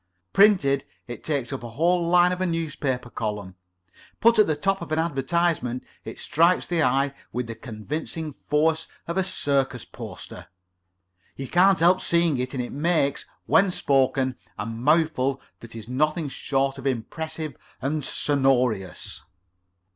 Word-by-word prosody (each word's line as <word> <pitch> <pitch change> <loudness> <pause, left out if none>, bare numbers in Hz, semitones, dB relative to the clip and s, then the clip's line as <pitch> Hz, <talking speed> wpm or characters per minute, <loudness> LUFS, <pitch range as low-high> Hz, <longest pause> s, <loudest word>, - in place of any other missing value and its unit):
Printed, 185 -10 +4 0.2
it 120 - -8
takes 140 -4 -2
up 135 - -4
a 120 - -7
whole 170 +7 +1
line 175 +1 +5
of 180 0 -3
a 185 - +1
newspaper 145 -7 -2
column; 105 -4 -4 0.7
put 230 0 +5
at 215 - +6
the 155 - +1
top 195 +5 0
of 170 - -7
an 155 - +1
advertisement, 155 -4 0 0.2
it - - -7
strikes 170 +3 +2
the 170 -2 0
eye 135 +1 +2 0.2
with 125 0 -2
the 115 - -6
convincing 145 +8 -5 0.2
force 160 +2 +2 0.2
of 170 - -3
a 190 - +2
circus 140 -8 -1
poster. - - -10 0.9
You 135 - -6
can't 180 +1 +4
help 180 +2 +5
seeing 170 -5 +2
it, 125 +2 -3
and 125 - -1
it 120 - -7
makes, 150 -2 0 0.2
when 195 - +4
spoken, 135 -5 +1 0.2
a 105 - -3
mouthful 135 +3 +1 0.2
that 115 -1 -12
is 110 -1 -8
nothing 150 +4 0
short 135 0 -1
of 135 - -3
impressive 155 +4 -3 0.2
and 145 +3 -2
sonorous." 130 -10 0
145 Hz, 150 wpm, -25 LUFS, 130-170 Hz, 0.9 s, at